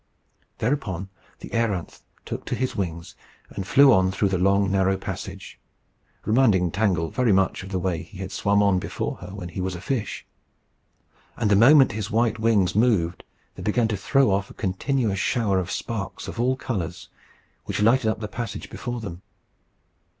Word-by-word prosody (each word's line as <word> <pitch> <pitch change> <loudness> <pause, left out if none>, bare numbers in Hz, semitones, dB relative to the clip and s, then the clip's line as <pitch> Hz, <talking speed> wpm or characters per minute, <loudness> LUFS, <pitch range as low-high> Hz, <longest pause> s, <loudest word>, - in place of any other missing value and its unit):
Thereupon 105 - -2 0.3
the - - -8
a�ranth 105 -7 -2 0.2
took - - -5
to - - -2
his 130 -3 -2
wings, 85 -5 -4 0.4
and 95 - -5
flew 140 +3 +7
on 95 -2 +3
through 95 +1 0
the 95 -2 0
long, 100 +1 +3
narrow 95 0 +2
passage, 95 - -7 0.7
reminding 105 -7 +3
Tangle 90 -5 0
very 125 -3 +2
much 95 0 +2
of 95 - -9
the 95 - -2
way 90 -2 -1
he 105 - -13
had 95 0 -6
swum 100 0 +2
on 100 -2 +3
before - - -4
her 90 - -10
when 95 -2 -7
he 90 +2 -5
was 95 0 -2
a - - -6
fish. 115 +4 -3 1.1
And 110 -3 +1
the - - +6
moment 135 +6 +7
his 105 0 -4
white 115 0 +1
wings 110 -5 +2
moved, 105 -7 +1 0.3
they - - -10
began 115 +2 +1
to 105 - 0
throw 130 +5 +2
off 100 0 0
a - - -13
continuous 105 +2 -1
shower 105 -5 +1
of 90 -1 -4
sparks 105 -4 -4
of - - -7
all 125 +2 +2
colours, 95 -11 -4 0.6
which - - -3
lighted 115 +1 +4
up 110 - -2
the 105 - -3
passage 105 -1 -6
before 120 -1 -5
them. 95 -4 -7
100 Hz, 180 wpm, -24 LUFS, 95-115 Hz, 1.1 s, flew